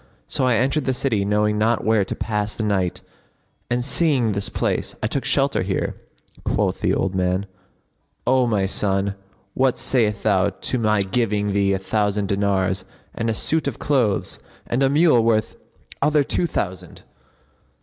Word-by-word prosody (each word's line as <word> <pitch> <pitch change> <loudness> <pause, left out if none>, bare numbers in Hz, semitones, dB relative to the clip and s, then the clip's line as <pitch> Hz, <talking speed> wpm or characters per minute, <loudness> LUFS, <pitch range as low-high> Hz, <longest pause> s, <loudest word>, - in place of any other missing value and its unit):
So 130 - 0
I 125 -2 +3
entered 130 +5 +1
the 130 - 0
city 115 -6 0
knowing 105 +1 +1
not 110 +2 +1
where 110 -2 +3
to - - -5
pass 105 -1 -2
the 110 - -3
night 95 -4 -1 0.7
and, 120 0 0
seeing 140 -6 +2
this 100 0 -1
place, - - -2
I - - +2
took - - -1
shelter - - +1
here." - - -2 0.5
Quoth - - 0
the - - +2
old 95 - -1
man, 95 +1 0 0.8
"O 130 0 +3
my 105 -4 +1
son, 95 0 0 0.4
what 130 -1 +1
sayest 110 -5 0
thou 100 -2 +3
to 125 +5 -1
my 105 -2 +2
giving 105 -1 0
thee 100 -1 +2
a - - +1
thousand 100 0 -1
dinars 100 -2 0 0.3
and 115 - -2
a 110 - 0
suit 160 +4 +1
of 135 - -3
clothes 120 -9 0 0.3
and 120 +3 -1
a 135 - +4
mule 145 -5 +4
worth 110 -2 +1 0.5
other 150 -1 +3
two 170 +5 0
thousand?" 95 - -5
105 Hz, 165 wpm, -22 LUFS, 100-125 Hz, 0.8 s, a